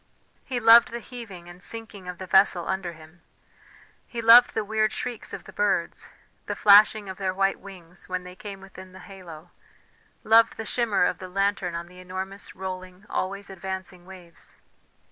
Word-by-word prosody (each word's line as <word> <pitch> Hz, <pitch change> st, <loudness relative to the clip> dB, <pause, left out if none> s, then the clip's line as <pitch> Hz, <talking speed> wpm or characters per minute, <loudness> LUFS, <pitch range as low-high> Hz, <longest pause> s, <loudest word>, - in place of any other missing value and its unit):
He 255 Hz, -3 st, -3 dB
loved 230 Hz, 0 st, +7 dB
the 235 Hz, -, -5 dB
heaving 225 Hz, -9 st, -10 dB
and 175 Hz, +1 st, -13 dB
sinking 220 Hz, -3 st, -9 dB
of 180 Hz, -1 st, -6 dB
the 185 Hz, -, -7 dB
vessel 190 Hz, -2 st, +3 dB
under 190 Hz, -2 st, -3 dB
him; 160 Hz, +2 st, -17 dB, 0.9 s
he 235 Hz, -, -6 dB
loved 230 Hz, +2 st, +7 dB
the 220 Hz, -1 st, -1 dB
weird 215 Hz, 0 st, +1 dB
shrieks 245 Hz, -3 st, -5 dB
of -, -, -7 dB
the -, -, -13 dB
birds, 195 Hz, -4 st, -1 dB, 0.4 s
the -, -, -3 dB
flashing 210 Hz, 0 st, +6 dB
of 190 Hz, -1 st, -7 dB
their 190 Hz, -2 st, -2 dB
white 195 Hz, 0 st, +1 dB
wings 180 Hz, -3 st, -13 dB
when 185 Hz, 0 st, -3 dB
they 180 Hz, 0 st, -11 dB
came 195 Hz, 0 st, -9 dB
within 190 Hz, -1 st, -13 dB
the 190 Hz, -, -12 dB
halo, 180 Hz, -6 st, -12 dB, 0.7 s
loved 225 Hz, +1 st, +4 dB
the 225 Hz, -, -5 dB
shimmer 215 Hz, -4 st, +1 dB
of 180 Hz, -, -1 dB
the 185 Hz, -, -8 dB
lantern 195 Hz, -2 st, -1 dB
on 170 Hz, 0 st, -5 dB
the 180 Hz, +1 st, -16 dB
enormous, 190 Hz, +2 st, -7 dB
rolling, 185 Hz, 0 st, -8 dB
always 200 Hz, +1 st, -3 dB
advancing 190 Hz, -1 st, -7 dB
waves. 180 Hz, -3 st, -14 dB
190 Hz, 175 wpm, -25 LUFS, 180-210 Hz, 0.9 s, loved